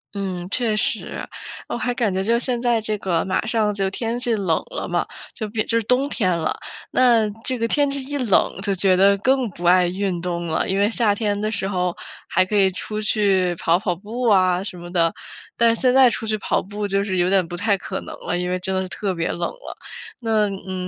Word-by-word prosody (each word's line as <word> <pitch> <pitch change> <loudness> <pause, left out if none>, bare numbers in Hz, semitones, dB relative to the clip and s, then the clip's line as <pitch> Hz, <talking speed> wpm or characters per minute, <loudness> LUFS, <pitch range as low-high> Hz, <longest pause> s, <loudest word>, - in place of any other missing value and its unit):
嗯， 185 -2 -4
确 225 -1 0
实， 215 - -2 0.4
我 - - -3
还 245 0 -1
感 230 -5 0
觉 190 +1 -1
就 235 +3 +2
现 245 -1 +1
在 235 -2 +1
这 215 0 -2
个 175 -4 0
马 190 +2 -1
上 220 -2 +1
就 195 -1 0
天 230 +3 -2
气 245 -2 +1
冷 190 -7 +1
了 - - -4
嘛， - - 0 0.3
就 220 - -4
比 215 +1 -1
就 230 0 +2
冬 250 +6 +1
天 185 -10 +1
了， 165 - -2 0.3
那 230 -4 +4
这 255 -2 -2
个 230 - +1
天 290 +3 +2
气 275 -1 -1
一 290 +1 -3
冷 225 -6 +2
就 200 -1 0
觉 190 0 +3
得 200 +1 +5
更 260 +2 +2
不 175 0 -8
爱 180 0 +5
运 185 -1 -2
动 170 0 -3
了。 160 - 0
因 195 +1 0
为 205 - +3
夏 225 -2 +2
天 205 -1 -1
的 215 +1 -1
时 195 -3 -2
候， 180 -2 -1 0.3
还 185 - +3
可 210 +3 -3
以 195 -2 +4
出 210 +4 -5
去 195 -4 +2
跑 165 +1 +2
跑 180 -2 -1
步 220 +7 -6
啊 185 -3 +3
什 195 -2 -7
么 175 0 -9
的， 165 -2 +2 0.4
但 230 -1 +4
现 250 +2 +2
在 265 -1 +7
出 225 - -4
去 215 0 0
跑 - - 0
步 205 +1 -4
就 195 0 +1
是 190 -2 -2
有 175 +1 +2
点 190 -3 +2
不 175 - -6
太 205 +2 +1
可 - - -5
能 - - -8
了， 175 - -1
因 180 0 -2
为 180 - 0
真 190 +1 -3
的 190 - +1
是 185 - -5
特 195 0 -2
别 165 -2 -2
冷 175 - -2
了。 - - -10 0.4
那， 220 -3 +1
嗯， 185 -1 -5
200 Hz, 255 characters per minute, -22 LUFS, 185-230 Hz, 0.4 s, 在